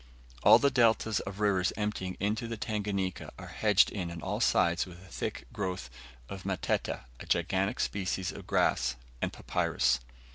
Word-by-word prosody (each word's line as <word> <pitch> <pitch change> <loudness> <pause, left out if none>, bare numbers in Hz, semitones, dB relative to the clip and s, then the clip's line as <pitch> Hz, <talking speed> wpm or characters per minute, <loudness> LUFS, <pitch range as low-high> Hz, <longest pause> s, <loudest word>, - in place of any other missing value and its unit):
All - - +9
the 140 - +3
deltas 110 -3 +3
of 95 +1 -6
rivers 95 -4 +2
emptying 105 -3 -2
into 105 +4 -1
the 115 0 -4
Tanganika 100 -3 -2
are - - -9
hedged 105 -3 +4
in 90 -4 -3
on 85 0 -6
all - - -3
sides 85 +2 +3
with 90 -1 -11
a 95 - -15
thick - - -4
growth 90 -11 -3 0.4
of 95 +4 -7
matete, 95 -2 -1 0.2
a - - -8
gigantic 95 +3 +1
species 95 -2 -1
of - - -10
grass, 65 +1 +2 0.3
and - - 0
papyrus. 60 - +1
95 Hz, 160 wpm, -30 LUFS, 90-105 Hz, 0.4 s, All